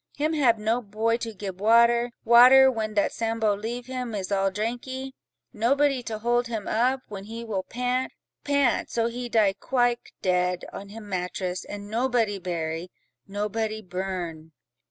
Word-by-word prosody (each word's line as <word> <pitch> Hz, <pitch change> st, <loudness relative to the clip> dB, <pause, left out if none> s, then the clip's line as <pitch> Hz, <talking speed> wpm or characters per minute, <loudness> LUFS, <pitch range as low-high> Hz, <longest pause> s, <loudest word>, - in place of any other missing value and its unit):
Him 305 Hz, +2 st, 0 dB
hab 255 Hz, -7 st, +3 dB
no 220 Hz, +3 st, 0 dB
boy 225 Hz, +2 st, 0 dB
to 230 Hz, -1 st, -5 dB
gib 195 Hz, -2 st, -7 dB
water, 235 Hz, +2 st, +5 dB, 0.2 s
water, 255 Hz, +3 st, +8 dB
when 215 Hz, -3 st, -3 dB
that 205 Hz, -, +2 dB
Sambo 225 Hz, -2 st, 0 dB
leave 235 Hz, +4 st, -5 dB
him 250 Hz, -3 st, -4 dB
is 195 Hz, -1 st, -4 dB
all 195 Hz, -1 st, +2 dB
drankee: 245 Hz, +6 st, -4 dB, 0.4 s
nobody 270 Hz, +4 st, +2 dB
to 225 Hz, -2 st, -5 dB
hold 240 Hz, +2 st, +1 dB
him 225 Hz, -3 st, -4 dB
up, 255 Hz, +4 st, +1 dB
when 200 Hz, -2 st, -8 dB
he 230 Hz, +2 st, -7 dB
will 205 Hz, -4 st, -2 dB
pant, 250 Hz, +5 st, -2 dB, 0.3 s
pant—so 270 Hz, -4 st, +1 dB
he 240 Hz, +1 st, -4 dB
die 215 Hz, -4 st, +3 dB
quike 245 Hz, +3 st, 0 dB
dead, 180 Hz, -1 st, +1 dB
on 200 Hz, -, -8 dB
him 215 Hz, 0 st, -10 dB
mattress, 180 Hz, -1 st, -3 dB
and 205 Hz, 0 st, -8 dB
nobody 230 Hz, -2 st, 0 dB
bury—nobody 195 Hz, +6 st, -4 dB
burn." 175 Hz, -4 st, -5 dB
225 Hz, 150 wpm, -26 LUFS, 200-245 Hz, 0.4 s, water